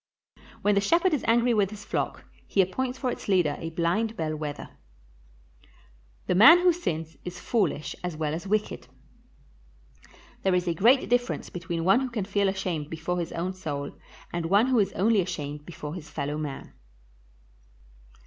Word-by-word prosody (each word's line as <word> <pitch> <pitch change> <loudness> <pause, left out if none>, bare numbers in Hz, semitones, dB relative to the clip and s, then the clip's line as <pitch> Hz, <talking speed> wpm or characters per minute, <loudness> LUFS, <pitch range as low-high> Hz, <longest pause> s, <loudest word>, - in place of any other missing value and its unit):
When 205 - +4
the 200 - +3
shepherd 335 - +3
is 295 - 0
angry 235 +1 +4
with 205 -4 +2
his 210 -1 -10
flock, - - -3 0.2
he - - -2
appoints 250 +8 +1
for 255 -2 -1
its - - -7
leader 180 -7 +2
a 165 - -4
blind 175 +7 -1
bell 155 -1 -2
wether. 150 -1 -5 1.6
The - - +1
man 230 - +9
who 355 0 +4
sins 160 - -4
is 180 0 -7
foolish 185 -10 -1
as 180 -3 -4
well 155 -1 -1
as 170 +5 -5
wicked. 210 +1 -1 1.5
There 190 -1 +2
is 180 0 0
a 170 - +2
great 240 - +4
difference 245 0 0
between 170 -1 -4
one 195 +7 +5
who 265 -1 -2
can 220 -5 -3
feel 200 0 +1
ashamed 180 -6 -3
before 165 +2 -3
his 170 - -3
own 180 +3 -2
soul 145 -6 -5 0.4
and 170 -1 -2
one 200 +6 +4
who 255 -3 +3
is 200 -2 +2
only 210 +1 +3
ashamed 150 -5 -5
before 150 -3 -7
his 165 -3 -8
fellow 150 0 -3
man. 145 -3 -6
185 Hz, 170 wpm, -27 LUFS, 165-220 Hz, 1.6 s, man